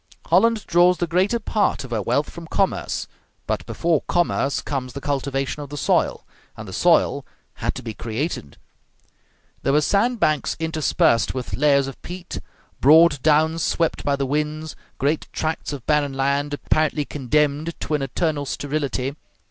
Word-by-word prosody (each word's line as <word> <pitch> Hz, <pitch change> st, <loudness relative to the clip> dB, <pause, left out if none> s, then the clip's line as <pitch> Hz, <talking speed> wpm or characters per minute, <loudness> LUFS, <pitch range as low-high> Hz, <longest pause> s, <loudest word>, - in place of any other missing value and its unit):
Holland 230 Hz, -2 st, +3 dB
draws 175 Hz, +1 st, +4 dB
the 175 Hz, -, 0 dB
greater 185 Hz, +7 st, +1 dB
part 210 Hz, -6 st, 0 dB
of 130 Hz, -, -10 dB
her 110 Hz, -2 st, 0 dB
wealth 140 Hz, +9 st, 0 dB
from 170 Hz, -1 st, -9 dB
commerce; 195 Hz, +3 st, -1 dB, 0.4 s
but -, -, -2 dB
before 165 Hz, -3 st, +1 dB
commerce 165 Hz, -5 st, +1 dB
comes 130 Hz, -3 st, -4 dB
the 140 Hz, -, -5 dB
cultivation 135 Hz, 0 st, -2 dB
of 145 Hz, -, -8 dB
the 145 Hz, -, -6 dB
soil; -, -, +1 dB, 0.3 s
and -, -, -8 dB
the -, -, -8 dB
soil -, -, +3 dB, 0.3 s
had -, -, -2 dB
to -, -, -7 dB
be 115 Hz, -2 st, -5 dB
created. 115 Hz, -, -4 dB, 1.0 s
There 135 Hz, -, +1 dB
were 150 Hz, -, +5 dB
sand 225 Hz, +8 st, +1 dB
banks 155 Hz, -7 st, +1 dB
interspersed 155 Hz, -8 st, +1 dB
with 130 Hz, -2 st, -5 dB
layers 140 Hz, -1 st, +3 dB
of 135 Hz, -, -8 dB
peat, 180 Hz, 0 st, -7 dB, 0.4 s
broad 150 Hz, 0 st, +6 dB
downs 160 Hz, +2 st, +3 dB
swept 165 Hz, +2 st, 0 dB
by 140 Hz, -, +1 dB
the 140 Hz, 0 st, -1 dB
winds, 150 Hz, +3 st, -2 dB, 0.2 s
great 145 Hz, +3 st, 0 dB
tracts 160 Hz, -1 st, -2 dB
of 140 Hz, -5 st, -7 dB
barren 150 Hz, -2 st, +1 dB
land 140 Hz, +2 st, 0 dB
apparently 155 Hz, 0 st, 0 dB
condemned 150 Hz, +4 st, 0 dB
to -, -, -3 dB
an 150 Hz, -, +1 dB
eternal 145 Hz, +2 st, -1 dB
sterility. 140 Hz, -2 st, -2 dB
150 Hz, 160 wpm, -22 LUFS, 140-165 Hz, 1.0 s, broad